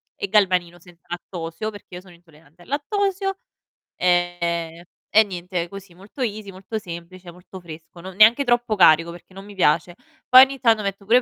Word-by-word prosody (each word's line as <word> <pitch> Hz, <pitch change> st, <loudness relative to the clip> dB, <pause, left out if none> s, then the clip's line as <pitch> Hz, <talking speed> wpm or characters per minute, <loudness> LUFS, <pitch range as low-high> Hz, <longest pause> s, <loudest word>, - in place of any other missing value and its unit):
e 200 Hz, -, -4 dB
galbanino 180 Hz, -4 st, +1 dB
senza 175 Hz, 0 st, -20 dB
lattosio, 175 Hz, +2 st, -6 dB
perché 205 Hz, -3 st, -12 dB
io 180 Hz, -, -8 dB
sono 185 Hz, -2 st, -17 dB
intollerante 165 Hz, -1 st, -23 dB
al -, -, -21 dB
lattosio, 390 Hz, +6 st, -2 dB, 0.6 s
ehm, 170 Hz, -2 st, -1 dB, 0.3 s
e 220 Hz, -, +8 dB
niente 180 Hz, -3 st, -5 dB
così 195 Hz, -2 st, -11 dB
molto 200 Hz, +9 st, -12 dB
easy, 210 Hz, -4 st, -4 dB
molto 195 Hz, +4 st, -6 dB
semplice, 175 Hz, 0 st, -10 dB
molto 180 Hz, +2 st, -13 dB
fresco, 170 Hz, 0 st, -13 dB
no 190 Hz, -, -8 dB
neanche 220 Hz, +7 st, +5 dB
troppo 240 Hz, -3 st, +1 dB
carico, 170 Hz, -3 st, +5 dB
perché 175 Hz, +2 st, -15 dB
non 195 Hz, +1 st, -11 dB
mi 205 Hz, -, -12 dB
piace. 175 Hz, -1 st, +1 dB, 0.3 s
Poi 255 Hz, +1 st, +10 dB
ogni 270 Hz, 0 st, -8 dB
tanto 225 Hz, -4 st, +3 dB
metto 200 Hz, 0 st, -5 dB
pure 230 Hz, +5 st, +5 dB
i -, -, +3 dB
185 Hz, 180 wpm, -22 LUFS, 175-215 Hz, 0.6 s, Poi